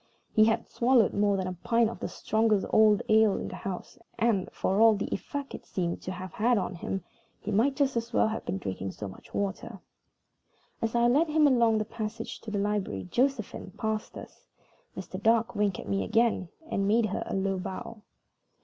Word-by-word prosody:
He 215 Hz, -1 st, +6 dB
had 220 Hz, 0 st, +1 dB
swallowed 240 Hz, -2 st, +3 dB
more 205 Hz, -1 st, +2 dB
than 190 Hz, -, -2 dB
a 185 Hz, -, -3 dB
pint 230 Hz, +6 st, +2 dB
of 230 Hz, -, -6 dB
the -, -, -3 dB
strongest 220 Hz, -2 st, +1 dB
old 215 Hz, -1 st, +5 dB
ale 215 Hz, -2 st, +4 dB
in -, -, -4 dB
the -, -, -7 dB
house; 190 Hz, -2 st, -6 dB, 0.2 s
and, 225 Hz, -5 st, +1 dB
for 195 Hz, +3 st, 0 dB
all 225 Hz, -1 st, +7 dB
the 200 Hz, -, -3 dB
effect 280 Hz, +6 st, -5 dB
it -, -, -7 dB
seemed 175 Hz, -2 st, -3 dB
to 185 Hz, -, -5 dB
have 185 Hz, -1 st, -7 dB
had 235 Hz, +2 st, +2 dB
on 190 Hz, -, -2 dB
him, 180 Hz, +1 st, -4 dB, 0.4 s
he 210 Hz, -, -5 dB
might 240 Hz, +7 st, +2 dB
just 275 Hz, -2 st, +1 dB
as 230 Hz, 0 st, -2 dB
well 225 Hz, -, +3 dB
have 220 Hz, -, -4 dB
been 95 Hz, -, -3 dB
drinking 95 Hz, 0 st, -4 dB
so 105 Hz, -, -6 dB
much 95 Hz, -, -13 dB
water. 200 Hz, -1 st, -3 dB, 1.0 s
As 225 Hz, +1 st, -1 dB
I 235 Hz, 0 st, +4 dB
led 290 Hz, +7 st, +3 dB
him 305 Hz, 0 st, +3 dB
along 235 Hz, -5 st, +4 dB
the 215 Hz, -, -1 dB
passage 225 Hz, 0 st, -6 dB
to 225 Hz, -, -8 dB
the 210 Hz, -, -2 dB
library 200 Hz, -, -1 dB
Josephine 245 Hz, -7 st, -1 dB
passed 220 Hz, -1 st, -3 dB
us. -, -, -12 dB, 0.5 s
Mr. 185 Hz, +1 st, -6 dB
Dark 225 Hz, +1 st, +3 dB
winked 205 Hz, -3 st, 0 dB
at -, -, -8 dB
me 195 Hz, -, 0 dB
again, 225 Hz, -5 st, +1 dB, 0.2 s
and 195 Hz, 0 st, 0 dB
made 225 Hz, +2 st, +3 dB
her 205 Hz, -, -2 dB
a -, -, -3 dB
low 195 Hz, 0 st, 0 dB
bow. 200 Hz, +4 st, -6 dB
215 Hz, 205 wpm, -28 LUFS, 195-230 Hz, 1.0 s, all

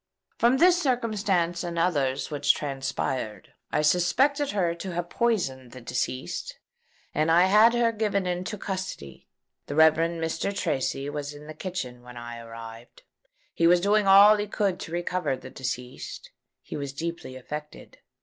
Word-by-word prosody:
From 240 Hz, +3 st, +4 dB
this 360 Hz, +3 st, +5 dB
circumstance 205 Hz, -, 0 dB
and 170 Hz, -1 st, -4 dB
others 140 Hz, -6 st, 0 dB
which 145 Hz, -1 st, +2 dB
transpired, 135 Hz, -6 st, -3 dB, 0.2 s
I 150 Hz, -, +1 dB
suspected 265 Hz, -, +2 dB
her 180 Hz, -5 st, 0 dB
to 175 Hz, +2 st, -6 dB
have 175 Hz, 0 st, -3 dB
poisoned 135 Hz, -, -1 dB
the 130 Hz, -, -9 dB
deceased; 125 Hz, +2 st, -3 dB, 0.6 s
and 155 Hz, +2 st, +1 dB
I 170 Hz, +2 st, +6 dB
had 215 Hz, +5 st, +6 dB
her 235 Hz, -1 st, +3 dB
given 210 Hz, -3 st, -1 dB
into 180 Hz, +4 st, -3 dB
custody. 185 Hz, -, -6 dB, 0.4 s
The 145 Hz, -, -4 dB
Rev. 160 Hz, 0 st, +7 dB
Mr. 165 Hz, +4 st, -2 dB
Tracy 135 Hz, +1 st, -1 dB
was 145 Hz, 0 st, -5 dB
in 145 Hz, +1 st, -12 dB
the 155 Hz, -, -8 dB
kitchen 150 Hz, -8 st, -5 dB
when 125 Hz, 0 st, -12 dB
I 120 Hz, 0 st, -7 dB
arrived. 115 Hz, 0 st, -11 dB, 0.5 s
He 165 Hz, -, +3 dB
was 175 Hz, +1 st, +6 dB
doing 205 Hz, +2 st, +2 dB
all 200 Hz, +2 st, +8 dB
he 205 Hz, 0 st, -2 dB
could 195 Hz, -2 st, -1 dB
to -, -, -7 dB
recover 175 Hz, -4 st, -1 dB
the 130 Hz, 0 st, -11 dB
deceased. 125 Hz, -1 st, -6 dB, 0.3 s
He -, -, -7 dB
was 140 Hz, -2 st, -4 dB
deeply 165 Hz, -3 st, -5 dB
affected. 150 Hz, +4 st, -8 dB
170 Hz, 155 wpm, -26 LUFS, 135-195 Hz, 0.6 s, all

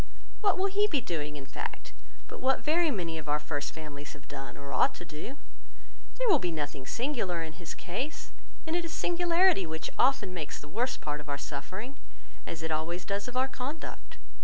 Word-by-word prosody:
What 400 Hz, -4 st, +5 dB
will 375 Hz, -, +3 dB
he 400 Hz, +1 st, +4 dB
be 300 Hz, -9 st, +3 dB
doing, 150 Hz, -, -2 dB
in 140 Hz, -2 st, -6 dB
fact, 435 Hz, -, -5 dB, 0.3 s
but -, -, -7 dB
what 265 Hz, +1 st, +3 dB
very 325 Hz, +2 st, +5 dB
many 170 Hz, -, -1 dB
of 150 Hz, -1 st, -6 dB
our 150 Hz, -, +4 dB
first 145 Hz, -1 st, -2 dB
families 145 Hz, -2 st, -7 dB
have 145 Hz, 0 st, -13 dB
done, 135 Hz, -3 st, -6 dB
or 140 Hz, 0 st, -6 dB
ought -, -, +5 dB
to 175 Hz, -, -7 dB
do? 160 Hz, -, -6 dB, 0.8 s
There -, -, +2 dB
will 375 Hz, -9 st, +7 dB
be 180 Hz, -, +1 dB
nothing 145 Hz, -4 st, -3 dB
singular 230 Hz, -, 0 dB
in 160 Hz, -1 st, -5 dB
his 170 Hz, 0 st, -6 dB
case; 255 Hz, -, -3 dB, 0.3 s
and 320 Hz, +1 st, 0 dB
it 350 Hz, -, +2 dB
is 335 Hz, -, -4 dB
singularity 350 Hz, -, +4 dB
which 160 Hz, 0 st, -3 dB
often 245 Hz, -8 st, +4 dB
makes 160 Hz, -5 st, -3 dB
the 150 Hz, -, -10 dB
worst 245 Hz, -, 0 dB
part 150 Hz, -1 st, -2 dB
of 150 Hz, -, -10 dB
our 140 Hz, -, 0 dB
suffering, 185 Hz, -, -5 dB, 0.5 s
as 160 Hz, -1 st, -4 dB
it 160 Hz, -, -1 dB
always 165 Hz, +3 st, 0 dB
does 200 Hz, +2 st, -1 dB
of 250 Hz, 0 st, -3 dB
our 260 Hz, +1 st, +4 dB
conduct. 270 Hz, +4 st, -5 dB
180 Hz, 205 wpm, -31 LUFS, -, 0.8 s, will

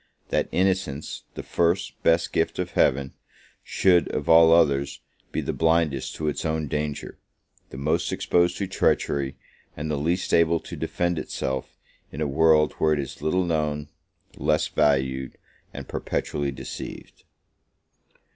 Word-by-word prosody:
that -, -, 0 dB
innocence, 95 Hz, -6 st, -1 dB
the -, -, -6 dB
first, 85 Hz, +3 st, 0 dB
best 85 Hz, 0 st, +2 dB
gift -, -, 0 dB
of -, -, -3 dB
Heaven, 70 Hz, +1 st, +2 dB, 0.5 s
should, 90 Hz, -3 st, +3 dB
of -, -, -3 dB
all 80 Hz, 0 st, +7 dB
others, 70 Hz, -4 st, +3 dB, 0.3 s
be -, -, -1 dB
the -, -, -3 dB
blindest 80 Hz, -4 st, +1 dB
to 80 Hz, -, -3 dB
its 75 Hz, -, -2 dB
own 80 Hz, -1 st, -1 dB
danger, 75 Hz, +1 st, -4 dB, 0.5 s
the -, -, -9 dB
most 70 Hz, +3 st, 0 dB
exposed 85 Hz, 0 st, +1 dB
to 100 Hz, -, -1 dB
treachery, 70 Hz, -7 st, 0 dB, 0.4 s
and 75 Hz, +1 st, -3 dB
the 75 Hz, -, 0 dB
least 85 Hz, +5 st, -1 dB
able 85 Hz, 0 st, +4 dB
to -, -, -8 dB
defend 85 Hz, -2 st, -1 dB
itself, 65 Hz, -3 st, -4 dB, 0.3 s
in 70 Hz, -, -8 dB
a 80 Hz, -, 0 dB
world 75 Hz, +1 st, +4 dB
where 80 Hz, -1 st, +3 dB
it 75 Hz, -, 0 dB
is 70 Hz, -2 st, -6 dB
little 90 Hz, +4 st, +1 dB
known, 75 Hz, -3 st, -1 dB, 0.5 s
less 75 Hz, 0 st, +1 dB
valued, 65 Hz, -3 st, +1 dB, 0.3 s
and -, -, -8 dB
perpetually 70 Hz, -1 st, -2 dB
deceived! 65 Hz, -, -8 dB
75 Hz, 145 wpm, -25 LUFS, 70-85 Hz, 0.5 s, all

